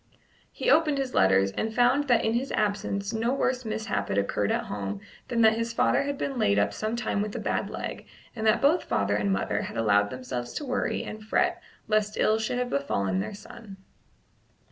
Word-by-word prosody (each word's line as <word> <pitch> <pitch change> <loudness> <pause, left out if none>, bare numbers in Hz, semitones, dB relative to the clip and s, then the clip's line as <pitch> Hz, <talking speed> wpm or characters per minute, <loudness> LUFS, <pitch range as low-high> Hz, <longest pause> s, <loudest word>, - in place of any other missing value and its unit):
He - - 0
opened 305 -2 +4
his 270 -2 -2
letters, 95 +1 +4
and 220 - -3
found 260 +5 +3
that 245 -3 +3
in 220 - +1
his 250 +4 -1
absence 205 0 -1
no 225 +2 0
worse 260 -1 0
mishap 220 -1 -2
had - - -2
occurred 100 +1 0
at - - 0
home 100 -1 -4 0.3
than 235 -1 0
that 220 -1 +6
his 230 0 -2
father - - +3
had 280 0 -3
been 270 -3 -3
laid 100 - +3
up 100 0 +2
some 215 - -2
time 235 -3 -1
with 210 0 -4
a - - -2
bad - - -1
leg, - - -6 0.3
and 220 -1 -1
that 215 +4 +3
both 320 +5 +3
father 100 0 0
and 100 -1 0
mother 100 +2 0
had - - -6
allowed 105 -2 +3
themselves 125 0 -5
to 295 - -4
worry 255 -1 -1
and 215 0 -8
fret - - +1 0.3
lest 215 -1 +1
ill 220 +1 +3
should 220 +3 -2
have 250 0 -2
befallen 100 -9 0
their 105 - -4
son. 205 -1 -12
215 Hz, 210 wpm, -27 LUFS, -, 0.3 s, that